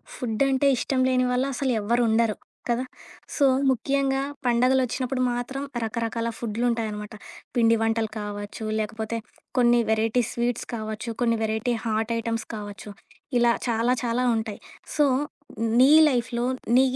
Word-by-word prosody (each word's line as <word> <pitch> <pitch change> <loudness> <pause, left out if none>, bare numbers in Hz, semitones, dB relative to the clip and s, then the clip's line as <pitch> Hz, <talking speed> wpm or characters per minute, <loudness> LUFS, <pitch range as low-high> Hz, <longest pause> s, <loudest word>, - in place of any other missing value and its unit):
ఫుడ్డంటే 265 +4 +1
ఇష్టం 265 +1 -1
లేని 255 -1 +2
వాళ్ళు 255 +2 +1
అసలు 265 +1 0
ఎవరు 235 +4 +1
ఉండరు. 225 -1 +2 0.3
కదా! 240 +2 +1 0.5
సో, 285 - +3 0.2
ముఖ్యంగా 270 +1 +1 0.2
పండుగలొచ్చినప్పుడు 255 +1 +1
మాత్రం 245 +3 -3 0.2
రకరకాల 230 +1 -2
ఫుడ్‌లుంటాయనమాట. 220 -2 -2 0.4
పిండి 230 -1 +4
వంటలు 225 -1 0
కావచ్చు, 205 +1 -6
లేకపోతే 220 +1 -3 0.4
కొన్ని 240 -1 +5
వెరైటీ 225 +2 +2
స్వీట్స్ 240 0 -2
కావచ్చు, 220 +1 -4
కొన్ని 230 -1 +2
వెరైటీ 220 +2 0
హాట్ 220 +1 0
ఐటమ్స్ 230 -1 -2
కావచ్చు, 205 0 -8 0.5
ఇలా 235 0 +4 0.2
చాలా, 230 +2 +2
చాలా 245 +1 0
ఉంటాయి. 220 -2 -4 0.4
సో, 295 - +5 0.7
నీ 260 +2 +7 0.2
లైఫ్‌లో 245 -3 0 0.3
నీ 255 - +7
235 Hz, 125 wpm, -25 LUFS, 220-250 Hz, 0.7 s, నీ